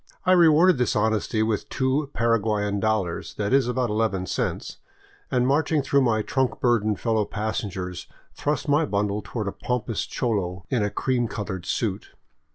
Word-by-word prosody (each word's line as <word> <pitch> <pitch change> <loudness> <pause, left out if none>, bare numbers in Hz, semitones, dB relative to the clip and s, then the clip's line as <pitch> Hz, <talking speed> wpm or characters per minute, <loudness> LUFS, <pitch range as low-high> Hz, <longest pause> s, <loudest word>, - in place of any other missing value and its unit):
I 185 - +4
rewarded 170 -2 +6
his 125 +1 +1
honesty 110 0 +1
with 110 -2 -2
two 135 +2 0
Para 115 -2 +2
guayan 105 -1 0
dollars, 105 -5 -1
— - - -33
that 105 +4 -1
is, 135 -3 +4
about 125 -2 0
eleven 105 -4 0
cents, - - -3 0.3
— - - -30
and 125 -1 +2
marching 145 +2 +2
through 140 0 +3
my 110 -4 +2
trunk 130 +1 -1
burdened 110 -4 +1
fellow 110 -2 +1
passengers, 100 -4 -4 0.3
thrust 150 +2 -2
my 145 +2 +3
bundle 105 -1 -1
toward 110 -4 -4
a - - -1
pompous 115 -2 -3
cholo 95 -6 -2
in 125 -4 +2
a 105 - +1
cream 120 +2 0
colored 100 -4 -5
suit. 105 -4 -2
110 Hz, 170 wpm, -24 LUFS, 105-130 Hz, 0.3 s, rewarded